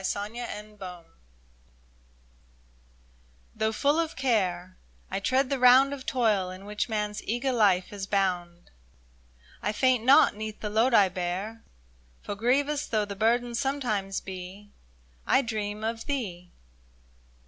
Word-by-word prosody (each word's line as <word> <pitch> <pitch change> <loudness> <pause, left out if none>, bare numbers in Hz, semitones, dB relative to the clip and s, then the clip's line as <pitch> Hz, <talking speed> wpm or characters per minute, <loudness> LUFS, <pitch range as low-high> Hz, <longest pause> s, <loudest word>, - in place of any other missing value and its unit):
69 210 +5 -3
MY 210 - -5 0.2
DREAM 180 -3 -8 2.5
'THROUGH 220 0 0
full 285 +7 +1
of 330 -1 -2
care 185 -8 0 0.4
I - - -1
tread 260 +6 +1
the 275 - 0
round 255 +3 +6
Of 270 -2 -8
toil 215 -8 +1
in 185 +2 -10
which 210 +3 -3
man's 210 -1 -2
eager 245 +4 -1
life 200 -6 +2
is 195 -1 -5
bound, 180 -3 -1 0.9
I 210 - 0
faint 255 +1 +2
not 265 -2 +6
'neath 215 0 -6
the 210 - -4
load 230 +3 +3
I 200 -3 +6
bear; 185 +5 -4 0.6
For - - -4
grievous 275 +7 0
though 215 -2 0
the 200 0 -7
burden 235 +3 +1
sometimes 230 -7 -1
be, 190 +2 -9 0.6
I 275 - +4
dream 215 -2 -4
of 225 +1 -3
thee 185 -11 -4
215 Hz, 135 wpm, -27 LUFS, 195-250 Hz, 2.5 s, round